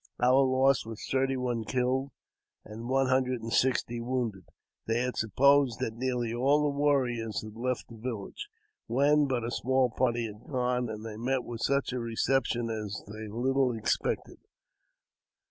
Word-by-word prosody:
Our 125 +2 +5
loss 130 0 +3
was 110 -1 -8
thirty 135 0 +1
one 120 -3 -1
killed, 130 +5 0 0.6
and 115 +3 -8
one 135 +1 +3
hundred 130 -2 +1
and 115 - -4
sixty 120 -2 +1
wounded. 115 -7 -2 0.4
They 115 +1 +1
had 125 0 -2
supposed 130 +3 +3
that 110 - -2
nearly 120 -1 -2
all 140 +5 +3
the 145 -1 0
warriors 125 -7 +1
had 110 -1 -8
left 125 0 -2
the 115 - -12
village, 110 - -5 0.4
when 145 +4 +3
but 125 -3 -1
a 120 - -3
small 130 0 +1
party 120 -1 0
had 105 +2 -10
gone, 125 -2 0
and 110 0 -6
they 110 -1 -6
met 125 +2 0
with 120 -1 -7
such 140 -1 +1
a - - -1
recep 120 +3 +1
tion 115 0 -2
as 105 -1 -4
they 110 +1 -7
little 125 +2 +1
expected. 110 - -1
125 Hz, 165 wpm, -29 LUFS, 115-130 Hz, 0.6 s, Our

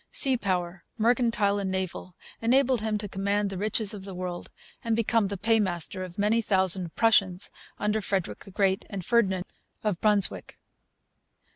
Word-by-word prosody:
Sea 265 -3 +4
power, 180 -5 -2 0.2
mercantile 230 -3 +2
and 195 -1 -2
naval, 185 -1 -4 0.3
enabled 255 +1 +3
him 215 -1 -1
to 205 0 -4
'command 200 +1 -1
the 190 - -5
riches 215 0 0
of 200 -2 -8
the 195 -1 -7
world' 180 -1 -5 0.3
and 230 -1 0
become 230 -2 +1
the 200 0 -4
paymaster 190 -4 0
of 180 -1 -9
many 210 +3 +2
thousand 190 -4 +2
Prussians 195 -5 +2 0.3
under 210 +1 0
Frederick 190 -3 -2
the - - -12
Great 195 0 +1
and 190 -4 -5
Ferdinand 190 -6 +2 0.4
of 205 -5 -1
Brunswick. 210 -3 +1
200 Hz, 155 wpm, -27 LUFS, 190-220 Hz, 0.4 s, Sea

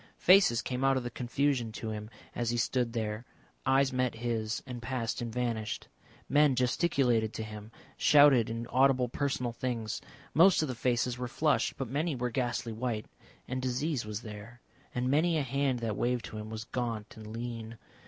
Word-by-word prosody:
Faces 180 - +5
came 125 +1 -2
out 135 0 +4
of 130 - -2
the 120 - -4
confusion 125 -1 0
to 110 0 -4
him 105 0 -6 0.2
as 120 -1 -1
he 120 - 0
stood 120 0 0
there, 110 -1 -2 0.4
eyes 135 0 +3
met 125 -1 0
his 115 -1 -2
and 125 -2 -7
passed 120 -1 -2
and 120 -1 -3
vanished. 115 -3 -2 0.4
Men 145 -2 +4
gesticulated 125 -4 +2
to 110 - -4
him, 105 0 -9 0.3
shouted 145 -6 +6
inaudible 125 +2 +2
personal 130 -2 -1
things. 115 -3 -3 0.3
Most 170 +1 +6
of - - -1
the 130 - -3
faces 125 +1 0
were 125 - -2
flushed, 150 +5 +1
but 135 - -3
many 145 +5 -1
were 125 -1 -2
ghastly 120 -2 -1
white. 115 -1 -2 0.4
And 130 +1 -3
disease 130 +2 -1
was 105 +1 -5
there, 110 +2 -9 0.4
and 125 +1 0
many 160 +5 +3
a 150 - +1
hand 135 0 0
that 110 -3 -1
waved 120 +1 0
to 110 - -7
him 105 0 -7
was 110 0 -5
gaunt 115 -3 -4
and 110 -1 -10
lean. 115 0 -6
120 Hz, 180 wpm, -31 LUFS, 115-130 Hz, 0.4 s, shouted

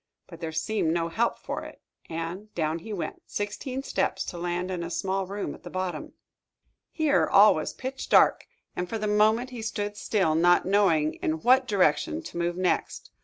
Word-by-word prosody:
But 170 -1 -13
there 165 -1 -3
seemed 160 +2 0
no 165 0 0
help 225 +8 0
for - - -5
it, - - -11 0.3
and 170 +6 -5
down 160 0 -1
he 220 +7 -9
went, 195 -5 -4
sixteen 255 +6 -4
steps, - - -1
to 175 - -6
land 175 +1 -2
in 180 -2 -3
a 170 - -4
small 190 +2 -2
room 200 +1 -4
at - - -13
the - - -9
bottom. 185 -1 -4 0.8
Here 310 -3 +2
all 205 +2 +7
was 155 - -3
pitch 265 +1 -6
dark, - - +5 0.3
and 180 0 -3
for 225 - -2
the 215 - -3
moment 215 +4 +2
he 240 -2 -6
stood 205 -2 -3
still, 195 -6 +1
not 175 +2 +4
knowing 180 -6 +2
in 155 0 -1
what 260 +2 +5
direction 150 - +1
to - - -8
move 170 +1 -1
next. 185 -1 -1
185 Hz, 190 wpm, -27 LUFS, 170-215 Hz, 0.8 s, all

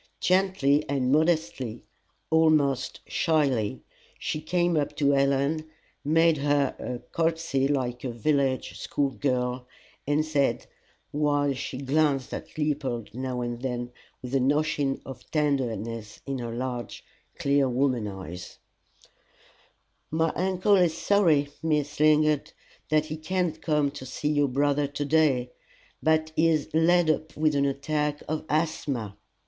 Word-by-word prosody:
Gently 185 -6 +2
and 130 -2 +1
modestly, 155 -6 0 0.5
almost 155 -5 +2
shyly, 140 - 0 0.3
she 155 - -3
came 175 +2 +1
up 145 -2 -1
to 140 -1 +3
Helen, 140 +3 +1 0.3
made 165 +2 +4
her 145 -1 +1
a 125 - -4 0.2
courtesy 160 -5 +1
like 125 -4 -1
a 130 - -2
village 135 +2 0
school 140 -2 -1
girl, 125 -2 -1 0.4
and 145 +2 +2
said, 145 -3 0 0.5
while 145 -1 +1
she 130 0 -5
glanced 140 -1 +1
at - - -7
Leopold 135 -8 -2
now 130 0 -3
and 120 0 -4
then 125 -2 -3 0.3
with 125 +1 -6
an 135 0 +3
ocean 145 -2 0
of 135 - -10
tenderness 115 -7 -2
in 135 -1 -3
her 120 -1 -4
large, 125 0 -5 0.3
clear 140 -1 +2
woman 125 -3 +1
eyes: 95 -3 -8 1.5
"My 160 +1 +1
uncle 190 +2 +2
is 175 -3 +2
sorry, 165 -8 +3
Miss 150 -3 -1
Lingard, 155 -1 +3 0.4
that 155 0 +3
he 155 0 -5
cannot 160 0 -2
come 150 -3 +1
to 140 -2 -9
see 145 +3 -2
your 145 -1 +2
brother 145 +2 +1
to 145 +1 -4
day, 140 -5 +2 0.5
but 160 0 +2
he 165 - +4
is 155 -3 +1
laid 165 +1 +4
up 155 0 -4
with 155 0 +2
an 140 -1 +2
attack 145 +1 -1
of 155 +1 -3
asthma. 145 - -1
145 Hz, 135 wpm, -27 LUFS, 130-155 Hz, 1.5 s, made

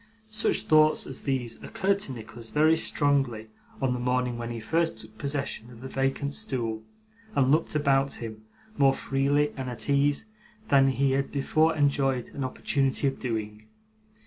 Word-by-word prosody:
Such 215 +1 +2
thoughts 155 -1 +4
as 135 - -5
these 130 -4 -2
occurred 195 +1 0
to 145 - -2
Nicholas 115 -1 -9
very 155 +4 +4
strongly, 135 -8 +1 0.3
on 130 -2 +1
the 125 - -3
morning 125 0 0
when 120 0 -5
he 120 -1 -4
first 165 +5 0
took 110 0 -9
possession 140 -3 -3
of 120 -2 -13
the 130 - -6
vacant 135 +2 -1
stool, 115 -6 -2 0.5
and 130 -1 +3
looked 155 +1 +2
about 140 -2 +2
him, 110 -2 -7 0.4
more 135 -1 +5
freely 140 +2 +1
and 130 -2 -4
at 120 - -5
ease, 145 +6 +2 0.4
than 135 -2 +5
he 135 0 +2
had 135 +1 0
before 155 +3 +2
enjoyed 135 -4 +1
an 140 - -5
opportunity 135 +1 0
of 135 -1 0
doing. 110 -3 -4
135 Hz, 165 wpm, -27 LUFS, 120-145 Hz, 0.5 s, more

